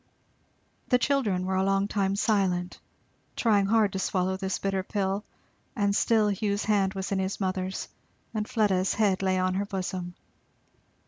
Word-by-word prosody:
The 250 - +4
children 235 -9 +1
were 190 - -1
a 190 - +2
long 195 +1 +2
time 195 -2 0
silent, 190 -4 0 0.6
trying 205 -4 +3
hard 215 -2 +3
to 190 - -2
swallow 190 0 0
this 190 0 -2
bitter 195 -1 -1
pill; 195 +1 -2 0.5
and 200 -3 +1
still 220 -1 +3
Hugh's 205 +1 -1
hand 200 -2 +2
was 190 0 -4
in 195 - +1
his 190 +1 -2
mother's 185 -1 -2 0.5
and 215 -1 -2
Fleda's 195 -4 +1
head 200 -3 +2
lay 190 -1 +1
on 185 0 +1
her 195 +2 -1
bosom. 185 -2 -4
195 Hz, 155 wpm, -27 LUFS, 190-210 Hz, 0.6 s, The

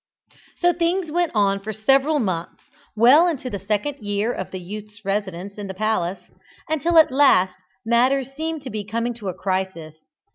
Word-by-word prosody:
So 350 0 +3
things 340 0 -1
went 345 +1 0
on 200 -1 +2
for 210 +2 -6
several 270 +8 +2
months, 185 - -3 0.3
well 260 +10 +6
into 265 -7 -3
the 200 - -4
second 215 +9 -2
year 205 +3 -1
of 185 - -5
the 185 - -6
youth's 210 +3 -10
residence 195 0 -3
in 205 - -5
the 190 - -7
palace, 200 -3 -2 0.4
until 325 +2 +1
at 315 -4 +7
last 190 -10 +3 0.2
matters 255 +3 +2
seemed 315 0 -4 0.2
coming 230 +2 -1
to 215 -4 -6
a - - -3
crisis. 185 -5 -3
220 Hz, 160 wpm, -22 LUFS, 195-285 Hz, 0.4 s, at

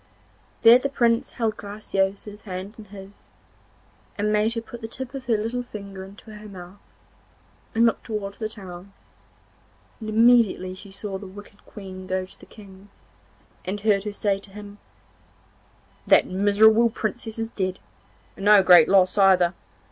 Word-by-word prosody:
There 235 +2 +8
the 275 - -2
Prince 235 -4 +1
held 225 -3 -2
Graciosa's 205 0 -3
hand 190 0 -7
in 215 - -10
his, 200 0 -14 0.9
and 210 +1 0
made 215 +2 +1
her 230 - -2
put 235 +1 -11
the 225 - -5
tip 255 +3 -6
of 270 -1 -7
her 230 -2 +1
little 230 +4 -3
finger 200 -5 -9
into 200 +3 -13
her 210 0 -11
mouth, 185 0 -12 1.0
and 230 +1 +4
look 230 - +1
towards 205 -3 -6
the 220 -1 -3
town, 190 -2 -10 1.1
and 215 -2 -6
immediately 225 -4 +3
she 185 +2 -11
saw 195 0 -6
the 200 - -9
wicked 205 +1 -14
Queen 185 -2 -10
go 185 0 -2
to 185 - -18
the - - -16
King, 200 -2 -15 0.7
and 195 +2 -4
heard 205 -2 +2
her 210 - -3
say 200 -1 0
to 200 - -9
him, 205 +1 -11 1.3
'That - - +5
miserable 215 +4 +4
Princess 225 0 -4
is 225 0 -4
dead, 185 -1 -3 0.6
and 195 - -7
no 205 -2 +7
great 180 -2 +7
loss 190 0 +3
either. 185 -2 +4
205 Hz, 160 wpm, -24 LUFS, 195-220 Hz, 1.3 s, There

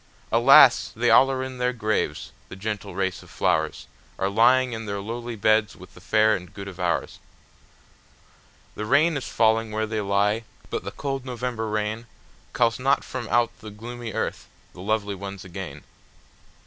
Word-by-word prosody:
Alas! - - +7
they - - +2
all 135 - +7
are 130 -1 -2
in 130 -1 -7
their 125 0 +1
graves, 110 -3 -2 0.2
the - - -8
gentle 105 0 -5
race 95 -1 -2
of - - -16
flowersAre 85 +4 -2
lying 125 +3 +4
in 115 -1 -6
their 100 0 -3
lowly 115 +3 -5
beds 110 0 +2
with 90 +1 -14
the 90 - -15
fair 110 +3 +3
and 90 -2 -9
good 100 -1 -7
of 95 -2 -9
ours. 90 -1 -1 1.5
The 105 - -5
rain 155 +6 +4
is 135 - -4
falling 110 0 +2
where 110 +1 -1
they 110 0 -2
lie, 100 +2 +1 0.3
but - - -3
the - - -4
cold 135 -2 -4
November 125 -3 -4
rainCalls 110 +2 -3
not 135 +2 +2
from 125 -3 -6
out 120 -1 +2
the 110 - -9
gloomy 115 +2 -7
earth - - -3 0.3
the 90 - -11
lovely 105 0 -1
ones 95 -1 -8
again. 85 -6 -8
110 Hz, 165 wpm, -24 LUFS, 100-120 Hz, 1.5 s, Alas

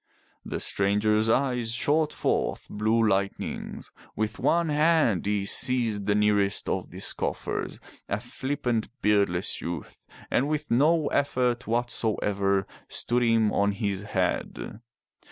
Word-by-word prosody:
The - - -4
stranger's 105 +2 +1
eyes 125 -2 +1
shot 150 +5 +2
forth - - -1
blue 110 +2 +2
lightnings. 100 -1 -2 0.2
With 110 +1 -2
one 170 -1 +2
hand 150 - +3
he 105 -1 0
seized 110 -3 +1
the 105 - +3
nearest 105 -1 +2
of - - -2
the - - -10
scoffers, - - -3 0.3
a - - -1
flippant 130 -5 -2
beardless 100 -4 +1
youth, 85 -3 -6 0.3
and 135 - +2
with 150 -2 -2
no 150 +6 +4
effort 125 -3 0
whatsoever 105 -4 0 0.2
stood 120 +1 0
him 115 -3 +3
on 100 0 +2
his 100 -2 -2
head. 100 +1 -2
110 Hz, 120 wpm, -27 LUFS, 100-125 Hz, 0.3 s, no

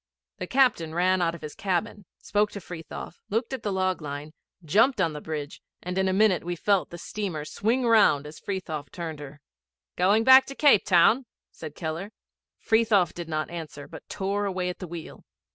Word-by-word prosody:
The 180 - -4
captain 240 -12 +2
ran 185 +1 +2
out 170 -1 +1
of 170 - -12
his 150 - -6
cabin, 200 +2 -2
spoke 210 +1 0
to 200 - -5
Frithiof, 175 -1 -9
looked 225 +5 -1
at 260 - -4
the 205 - -2
log 185 -2 0
line, 145 +1 -6 0.3
jumped 225 - +3
on 165 -4 +1
the 150 - -7
bridge, 150 -2 -6 0.2
and 180 +1 -4
in 190 0 +1
a - - +2
minute 195 -1 +3
we 175 +1 -3
felt 195 +2 +1
the 175 - -8
steamer 175 -5 -4
swing 235 +9 0
round 210 -11 +4
as 150 +1 -10
Frithiof 160 -8 -5
turned 165 -4 -6
her. 145 0 -10 0.6
''Going 200 +5 +4
back 260 0 +8
to 275 - -7
Cape 285 -9 +5
Town?' 215 +8 +4 0.2
said 155 -2 -9
Keller. 165 +5 -5 0.5
Frithiof 215 -6 +2
did 170 -2 -7
not 155 0 -2
answer, 155 -4 -7
but - - -12
tore 200 +1 -2
away 185 -2 -2
at 180 - -6
the 185 - -6
wheel. 170 -2 -9
180 Hz, 195 wpm, -26 LUFS, 160-210 Hz, 0.6 s, back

